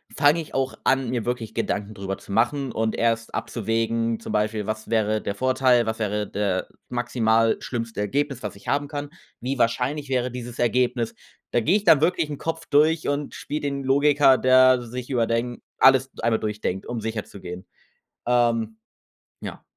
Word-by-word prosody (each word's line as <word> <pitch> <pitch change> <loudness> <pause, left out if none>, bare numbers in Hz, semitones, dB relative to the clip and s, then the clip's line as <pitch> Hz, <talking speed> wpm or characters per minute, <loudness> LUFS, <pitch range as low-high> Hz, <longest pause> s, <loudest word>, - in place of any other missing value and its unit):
fange 150 +3 +4
ich 155 - -11
auch 135 0 0
an, 135 -2 +2
mir 120 -3 -1
wirklich 120 -3 -3
Gedanken 100 +1 -2
drüber 95 -1 -4
zu - - -12
machen 125 +5 +1
und 110 0 -1
erst 115 -1 0
abzuwägen, 115 0 -1
zum - - -7
Beispiel 105 0 0
was 110 +1 -4
wäre 110 -1 +1
der 100 - -3
Vorteil, 130 0 +3
was 110 0 -3
wäre 105 -1 -1
der 100 -2 -1 0.2
maximal 115 -2 +2
schlimmste 115 -3 -4
Ergebnis, 135 +5 -1
was 105 -2 -5
ich 100 - -16
haben 145 0 0
kann? 145 0 -5 0.3
Wie 130 +2 -3
wahrscheinlich 130 +5 0
wäre 125 -1 0
dieses 120 -1 -7
Ergebnis? 120 -1 +1 0.4
Da - - +3
gehe 160 - +2
ich 205 - -5
dann 155 -8 +6
wirklich 165 -1 +1
im 145 - -5
Kopf 165 0 -4
durch 155 +2 +3
und 145 0 -2
spiele 150 - -4
den 140 -1 -3
Logiker, 140 0 +4
der 130 0 +6
sich 120 +1 -7
überdenk 120 0 0 0.2
alles 130 0 +5
einmal 115 -1 +2
durchdenkt, 105 -3 -3
um 120 -2 -4
sicher 110 -1 -3
zu 100 - -13
gehen. 90 0 -8 0.6
Ähm, 115 -2 +1 0.6
ja. - - -8
120 Hz, 175 wpm, -24 LUFS, 110-135 Hz, 0.6 s, dann